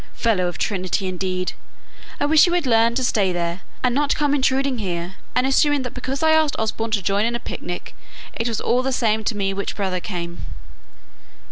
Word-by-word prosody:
Fellow 205 -6 +1
of 175 - -4
Trinity, 190 -1 -1
indeed! 185 0 -2 0.7
I - - +2
wish 305 +1 +6
he - - 0
would 350 -3 +1
learn 230 -1 +4
to 260 - 0
stay 205 -6 +2
there, 170 +1 -2 0.2
and 250 -1 +2
not 285 +2 +2
come 290 -1 +1
intruding 265 -2 +1
here, 175 -2 -3 0.2
and 250 +1 +3
assuming 280 +1 +3
that 250 - -5
because 265 +4 -3
I 315 - +5
asked 315 -2 +3
Osborne 220 +1 -1
to 210 -3 0
join 200 +2 +1
in 235 +1 0
a - - -2
picnic 175 -6 -6 0.4
it 230 - -2
was 230 -2 -1
all 250 +1 +2
the 265 +1 -1
same 220 -3 +1
to 215 - -1
me 195 -1 0
which 200 +1 -3
brother 190 -3 -1
came." 175 -2 -5
225 Hz, 205 wpm, -22 LUFS, 190-265 Hz, 0.7 s, wish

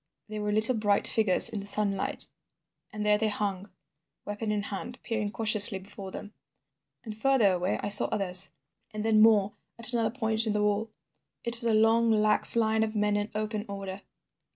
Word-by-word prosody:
They 215 0 -6
were 210 0 -3
little 220 +4 +3
bright 205 -2 +1
figures 215 -5 +5
in 215 - -5
the 200 - -7
sunlight, 200 -1 0 0.6
and 210 -1 -6
there 210 0 +2
they 220 - 0
hung, 205 -2 -4 0.6
weapon 210 +1 -5
in 210 -1 -2
hand, 215 +5 -8
peering 215 -3 -3
cautiously 215 -2 +1
before 190 0 -11
them. 205 +2 -10 0.7
"And 220 -4 -9
further 235 -3 +2
away 180 +1 -2
I 205 - -3
saw 205 - +7
others 185 -4 -1 0.4
and 215 0 -5
then 220 -1 +3
more 210 -2 +3 0.2
at 230 +1 -2
another 230 -2 0
point 225 -2 -3
in 215 - -1
the 210 0 -1
wall. 210 +2 -1 0.5
It 235 0 -3
was 235 - -5
a 225 -2 +2
long 225 +1 +2
lax 215 0 +5
line 220 -1 +1
of 220 0 -3
men 210 0 0
in 205 +1 -3
open 215 0 -4
order. 195 -1 -7
210 Hz, 185 wpm, -27 LUFS, 205-220 Hz, 0.7 s, saw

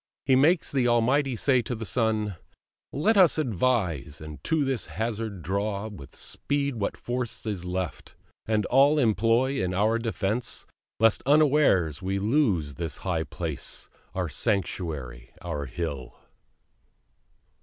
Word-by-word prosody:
He 130 -1 +4
makes 155 +6 +3
the 130 -3 +2
Almighty 125 +3 +2
say 130 +2 +3
to 120 - -4
the 110 0 -6
Son 110 -1 0 0.6
"Let 205 - +2
us 180 -5 +6
advise, 100 - 0
and 75 -1 -10
to 160 -3 +1
this 135 -4 -2
hazard 110 -5 -4
draw 100 +4 -2
With 70 -10 -11
speed 140 -3 -1
what 100 - -2
force 120 -2 -4
is 100 -5 -3
left, 90 -1 -4 0.3
and 110 -1 +1
all 140 +4 +4
employ 115 +1 +2
In 90 0 -1
our 110 +4 +2
defence, 115 0 -2 0.3
lest 115 -1 +4
unawares 140 - +4
we 95 +1 -1
lose 100 - +1
This 80 -3 -4
our - - -16
high 85 -4 0
place, 80 -3 -5 0.2
our 90 -2 -1
sanctuary, 75 - -2
our 75 -5 -3
hill." 70 -2 -5
110 Hz, 135 wpm, -27 LUFS, 90-130 Hz, 0.6 s, us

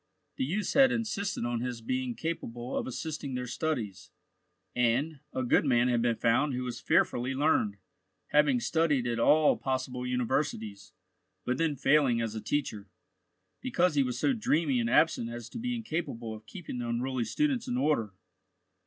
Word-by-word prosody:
The - - 0
youths 195 +9 -1
had 270 -1 +6
insisted 215 - -2
on 120 -1 -1
his 125 -1 -3
being 125 +1 -2
capable 125 -7 -4
of - - -2
assisting 145 +1 -4
their 125 0 -3
studies, 110 - -3 0.7
and, 125 +6 +1
a 130 - -2
good 120 - +3
man 125 -3 +3
had 120 -1 +2
been 120 -1 +2
found 125 +5 +2
who 125 - -2
was 125 -1 -5
fearfully 125 +2 +1
learned, 135 -8 +2 0.5
having 145 -4 +4
studied 150 0 +1
at 120 -1 -1
all 150 +5 +5
possible 130 -1 -2
universities, 125 -5 -2 0.5
but 125 +1 -1
then 160 -3 +1
failing 135 -3 +3
as 115 -2 -2
a 110 - -5
teacher, 110 -9 -2 0.7
because 180 -9 +1
he 145 - +3
was 125 -2 -1
so 275 - +2
dreamy 160 - +1
and 115 -1 0
absent 125 -4 +3
as 120 -1 -7
to - - -7
be 245 +1 -2
incapable 155 - -4
of 110 0 -11
keeping 150 -3 -7
the 120 -1 -3
unruly 125 +1 -1
students 275 - 0
in 125 - -1
order. 125 -8 0
130 Hz, 170 wpm, -30 LUFS, 120-155 Hz, 0.7 s, had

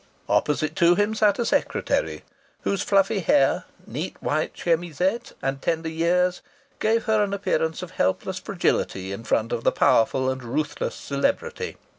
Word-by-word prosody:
Opposite 150 +8 +1
to 170 +1 +5
him 205 +2 +1
sat 210 -2 +3
a 235 - 0
secretary - - 0 0.4
whose 200 - -1
fluffy 195 +1 +2
hair, 285 - +3 0.2
neat - - -5
white - - -1
chemisette, 175 +5 -1
and 135 0 -2
tender 165 -1 -1
years 180 +3 +1 0.4
gave 225 +1 +2
her 220 -2 +2
an 200 0 -1
appearance 185 -3 -1
of 180 - -8
helpless 95 - -1
fragility 95 0 -1
in 100 +4 -6
front 115 0 0
of 115 - -2
the - - +4
powerful 130 +3 +3
and 130 -1 -6
ruthless 145 +5 -2
celebrity. 375 - -2
175 Hz, 150 wpm, -24 LUFS, 140-205 Hz, 0.4 s, to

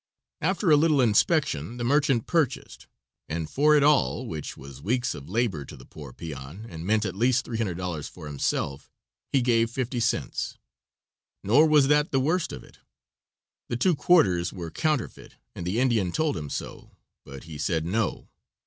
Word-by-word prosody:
After 185 +1 +1
a 150 - +7
little 155 -1 +3
inspection 120 - +2
the 120 - -3
merchant 135 -2 +2
purchased, 160 -7 -1 0.4
and 80 0 -3
for 150 - +3
it 145 - +4
all, 145 -3 +3
which 80 - -6
was 70 0 -11
weeks 125 - 0
of 70 - -10
labor 105 -8 0
to - - -11
the - - -14
poor 75 -4 -11
peon, 75 - -8
and 85 -4 -8
meant 110 0 +2
at 90 - -2
least 120 +4 +1
$300 90 - -3
for - - -11
himself, 70 -1 -2 0.4
he 135 -3 +2
gave 115 -2 +2
fifty 125 +1 -3
cents. 115 - -1 0.9
Nor 140 +10 +5
was 150 -3 +5
that 150 +1 +3
the 135 - +1
worst 160 +6 0
of - - -8
it; - - -19 0.9
the 120 - -1
two 180 +8 +3
quarters 95 - +3
were 85 -4 -7
counterfeit 155 -7 -2 0.2
and 85 - -6
the 100 +6 0
Indian 115 -8 +2
told 155 - 0
him 75 -3 -5
so, - - -7 0.3
but 70 -1 -10
he 80 -3 -9
said 80 +1 -1
no. 105 +4 -1
115 Hz, 170 wpm, -26 LUFS, -, 0.9 s, a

